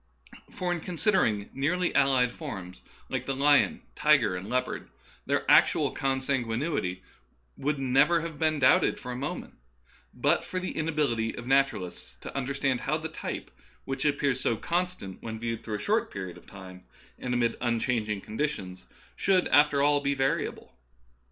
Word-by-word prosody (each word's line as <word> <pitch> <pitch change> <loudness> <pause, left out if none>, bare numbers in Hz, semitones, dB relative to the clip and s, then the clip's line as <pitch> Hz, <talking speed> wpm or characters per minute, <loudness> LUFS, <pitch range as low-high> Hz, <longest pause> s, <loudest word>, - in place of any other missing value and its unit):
For 180 -1 -3
in 175 - -1
considering 165 - +1
nearly 175 +6 0
allied 130 -3 +3
forms, 95 - -7 0.3
like - - -3
the 135 - -1
lion, 145 +1 +3
tiger, 150 -11 +4
and 95 +3 -6
leopard, 125 +1 -2 0.4
their - - +1
actual - - +5
con 135 -1 -1
sanguinity 120 - -1 0.5
would 150 +1 -1
never 135 +6 +3
have 165 -3 -6
been 155 -1 +2
doubted 135 -3 +4
for 125 - -7
a - - -4
moment 135 +4 -5 0.6
but - - +1
for 185 - -3
the 185 - -4
inability 150 -8 0
of 120 - -7
naturalists 130 - 0
to - - -8
un 135 -2 -2
derstand 135 -2 0
how 150 +5 0
the 160 0 -5
type - - -6 0.3
which 135 0 -3
appears 140 -3 +1
so 115 - +1
constant, 175 - -3
when 110 -1 -5
viewed 115 -1 -3
through 110 - -3
a - - -4
short 215 - 0
period 95 -3 -6
of - - -16
time 95 -2 -11 0.4
and 125 -1 -2
amid 120 -1 +1
unchanging 115 -3 0
conditions, 105 -7 -4 0.3
should 185 -2 +2
after 145 0 +5
all 145 0 +4
be 140 0 0
variable. 135 0 -1
135 Hz, 160 wpm, -28 LUFS, 115-150 Hz, 0.6 s, actual